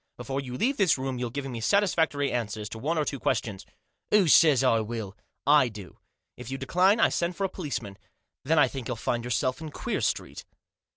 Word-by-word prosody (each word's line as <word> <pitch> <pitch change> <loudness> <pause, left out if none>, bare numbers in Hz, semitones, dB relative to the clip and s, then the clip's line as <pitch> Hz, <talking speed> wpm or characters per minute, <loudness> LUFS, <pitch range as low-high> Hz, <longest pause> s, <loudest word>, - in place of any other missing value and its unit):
Before 135 +3 -4
you 125 -2 -6
leave 270 - 0
this 190 - +3
room 130 -1 -3
you'll 125 -1 -2
give 140 +3 -5
me 120 -4 -5
satisfactory 160 - +1
answers 110 -3 -3
to 110 - -8
one 155 +7 -1
or 150 - +1
two 140 - -4
ques - - +1
tions." 100 -4 -8 0.4
"Who 210 -4 +4
says 150 -3 +6
I 115 -3 +3
will?" 110 -3 -5 0.3
"I 145 -3 +5
do. 105 -4 -11 0.4
If 125 -1 -9
you 135 - -4
decline 180 - +2
I - - +5
send 175 +1 -1
for 195 - -3
a 195 - 0
policeman. 125 - -5 0.4
Then 160 +4 +1
I 150 - +6
think 130 -4 -6
you'll 125 - -2
find 120 +2 -2
yourself 125 +4 -1
in 160 - -6
Queer - - -3
Street." - - -2
135 Hz, 215 wpm, -27 LUFS, 120-160 Hz, 0.4 s, says